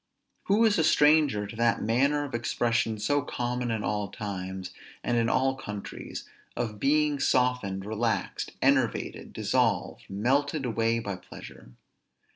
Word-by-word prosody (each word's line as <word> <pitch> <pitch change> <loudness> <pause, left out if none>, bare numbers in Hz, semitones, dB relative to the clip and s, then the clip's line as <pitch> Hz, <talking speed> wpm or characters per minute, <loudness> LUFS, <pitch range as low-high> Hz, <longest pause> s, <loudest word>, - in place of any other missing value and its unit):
Who 210 +4 +4
is 210 -5 +3
a - - +4
stranger 150 -9 +4
to 105 - -9
that 115 0 +2
manner 140 +6 +2
of 140 - -7
expression 115 -1 0
so 145 +8 +1
common 125 -2 -3
in 110 -2 -1
all 105 -1 -1
times 95 -2 -5 0.3
and 120 - 0
in 115 -1 +2
all 135 0 +2
countries, 105 -6 -7 0.3
of 110 -4 -3
being 150 +2 +2
softened, 125 -8 +1
relaxed, 110 +2 -2
enervated, - - +1
dissolved, - - 0
melted 135 +8 0
away 115 -1 +1
by 100 -4 -4
pleasure? - - -12
120 Hz, 135 wpm, -28 LUFS, 105-140 Hz, 0.3 s, Who